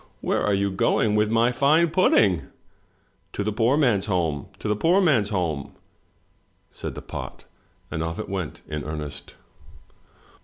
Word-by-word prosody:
" - - -37
Where - - +2
are 105 - +2
you 100 0 0
going 105 +2 +1
with 105 0 +2
my 115 +2 +3
fine 150 +6 +3
pudding?" 95 - +3 0.9
"To 100 - -2
the 105 - -1
poor 115 +6 +2
man's 115 -9 +2
home, 85 -7 -1
to - - -6
the 105 - +1
poor 170 - +3
man's 135 - +3
home," 80 -8 -2 1.0
said - - -7
the - - -8
pot, - - -8 0.5
and 80 - -3
off 80 0 -3
it - - -5
went 95 -5 -5
in 75 -1 -4
earnest. 75 -1 -6
100 Hz, 160 wpm, -24 LUFS, 80-120 Hz, 1.0 s, my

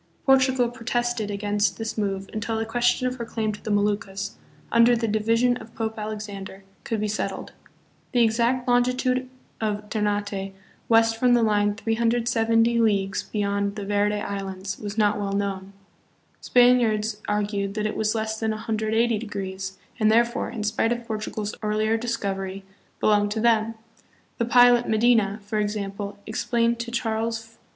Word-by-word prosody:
Portugal 260 -2 +4
protested 240 -2 -2
against 205 -2 0
this 225 -1 -4
move 195 -2 -2
until 220 +1 -2
the 225 - -1
question 240 +2 +1
of 255 0 -1
her 235 - -4
claim 220 -2 -2
to 210 - -9
the - - -6
Moluccas, 205 -1 -1 0.4
under 235 +1 +5
the 230 0 -1
division 230 +3 +2
of 230 -2 -13
Pope 220 -1 -2
Alexander, 205 -2 -6 0.2
could 225 -2 -2
be 215 - -1
settled. 210 +1 -3 0.6
The 245 -2 +4
exact 235 +3 +1
longitude 250 +1 +1 0.3
of 210 -1 -2
Ter 215 - -1
nate 205 -2 -2 0.3
west 225 0 +4
from 245 +1 +4
the 235 - +3
line 205 -1 +2
370 230 +1 +2
leagues 200 -3 +1
beyond 200 -1 -1
the 205 -2 -5
Verde 205 +1 +1
Islands 195 -1 -5
was 205 0 -6
not 210 -1 +2
well 200 -1 -2
known. 195 -1 -2 0.7
Spaniards 225 -4 +3
argued 205 -1 -1
that 215 -1 -1
it 215 - -2
was 215 +1 0
less 220 0 -2
than 220 - -1
180 220 +1 0
degrees, 195 -3 -5 0.2
and, 215 -1 +4
therefore, 235 +2 +2
in 220 - -5
spite 220 +2 +1
of 240 0 -2
Por 220 -2 -3
tugal's 215 0 -4
earlier 215 +1 +1
discovery, 195 -5 -3 0.4
belonged 205 -1 +3
to 220 - -2
them. 225 -1 +2 0.6
The 235 - +2
pilot, 245 0 +5
Medina, 220 -2 +3
for 215 +1 -1
example, 205 -1 -3
explained 235 -1 0
to 235 0 -4
Charles 225 -1 -2
V. 225 - -21
220 Hz, 160 wpm, -24 LUFS, 205-235 Hz, 0.7 s, under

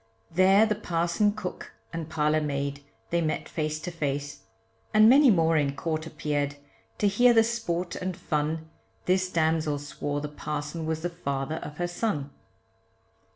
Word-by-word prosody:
There 190 +5 +5
the 215 - +1
parson, 175 0 +1
cook, 205 -4 -6 0.2
and 165 -1 -4
parlour 155 0 +1
maid 140 -1 -2 0.3
they 170 0 +2
met 155 -1 -1
face 155 -1 -2
to 175 - -5
face, 145 -3 -3 0.6
And 215 0 +8
many 270 +3 +7
more 165 -5 +4
in 140 -2 +1
court 160 +1 -2
appeared, 145 -2 -2 0.4
to 205 - +2
hear 240 +5 +5
the 225 - +7
sport 185 -7 -2
and 180 -1 -4
fun, 160 -1 -2 0.4
This 185 0 +2
damsel 160 -3 +1
swore 145 0 -4
the 150 - -4
parson 150 +2 -4
was 160 0 -2
the 175 - 0
father 140 -2 -3
of 150 -2 -8
her 175 - -1
son. 175 -6 -2
160 Hz, 155 wpm, -27 LUFS, 150-185 Hz, 0.6 s, And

